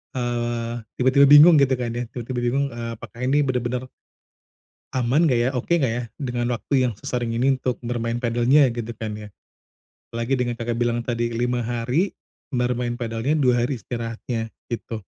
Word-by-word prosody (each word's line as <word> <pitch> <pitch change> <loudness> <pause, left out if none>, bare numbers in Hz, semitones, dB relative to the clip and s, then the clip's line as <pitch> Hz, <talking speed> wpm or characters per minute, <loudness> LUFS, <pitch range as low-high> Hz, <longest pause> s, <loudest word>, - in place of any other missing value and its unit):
eee, 120 -1 -2 0.2
tiba-tiba 130 +2 +5
bingung, 150 +2 +9
gitu 135 -1 +3
kan 120 -2 -3
ya. 120 0 -3
Tiba-tiba 120 +1 -5
bingung, 130 +4 +1
eee, 115 0 -5
apakah 115 - -12
ini 140 +4 +2
benar-benar, 125 -1 -1 1.1
aman 135 +7 +3
enggak 125 - +3
ya. 120 +2 +2
Oke 135 +7 0
enggak 135 -8 +1
ya 120 0 -2
dengan 120 -3 -2
waktu 130 0 +1
yang 110 - -6
sesering 120 0 -3
ini 130 +2 +2
untuk 125 -2 -1
bermain 115 -1 -2
padelnya, 120 +3 +3
gitu 120 -1 -5
kan 110 -2 -4
ya. 105 - -9 0.8
Apalagi 115 +3 -1
dengan 125 -1 -1
Kakak 115 0 -2
bilang 120 0 0
tadi, 120 0 -2
5 120 0 -1
hari, 125 - 0 0.4
entar 125 -1 +1
main 120 0 -3
padelnya 115 +4 -1
2 120 -2 +3
hari 125 -3 -3
istirahatnya, 115 +1 -4 0.2
gitu. 115 -2 -5
120 Hz, 170 wpm, -23 LUFS, 115-130 Hz, 1.1 s, bingung